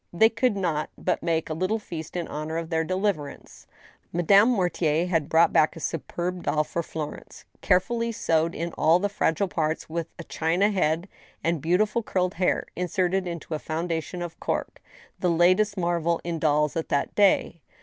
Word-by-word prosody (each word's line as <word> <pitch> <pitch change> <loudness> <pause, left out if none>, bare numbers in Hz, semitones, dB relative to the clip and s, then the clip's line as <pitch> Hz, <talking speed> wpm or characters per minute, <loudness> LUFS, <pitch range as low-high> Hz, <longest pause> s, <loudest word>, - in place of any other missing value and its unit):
They 220 +6 +5
could 230 -1 0
not 165 -5 -1
but 180 - -1
make 165 -1 0
a 155 - -3
little 185 +7 0
feast 165 -7 -8
in 175 -2 -2
honor 155 +2 -4
of 165 0 -5
their 160 0 +1
deliverance. 185 -4 -3 0.4
Madame 195 +6 +5
Mortier 175 -7 +1
had 165 -5 0
brought 165 +1 +4
back 155 - +3
a - - -8
superb 175 +3 -3
doll 155 -2 +1
for 170 - -3
Florence, 155 -2 -7 0.2
carefully 230 +5 +1
sewed 165 -5 0
in 170 0 -4
all 160 +2 +4
the 205 +3 -1
fragile 200 -1 0
parts, 160 -2 -2
with 165 0 -2
a 170 - -7
china 175 +7 +1
head 170 -2 0 0.4
and 165 -3 0
beau 170 +4 +2
tiful 215 +3 +1
curled 185 -4 -1
hair, 180 +1 0
inserted 180 +1 0
into 170 -1 -5
a 155 - -2
foundation 165 +2 -3
of 170 -1 -8
cork, - - -3 0.4
the 180 - +1
latest 185 +5 +3
marvel 170 -1 0
in 170 -1 -3
dolls 150 -1 +2
at 165 - -3
that 140 - 0
day. 195 -5 +3
170 Hz, 180 wpm, -26 LUFS, 160-185 Hz, 0.4 s, They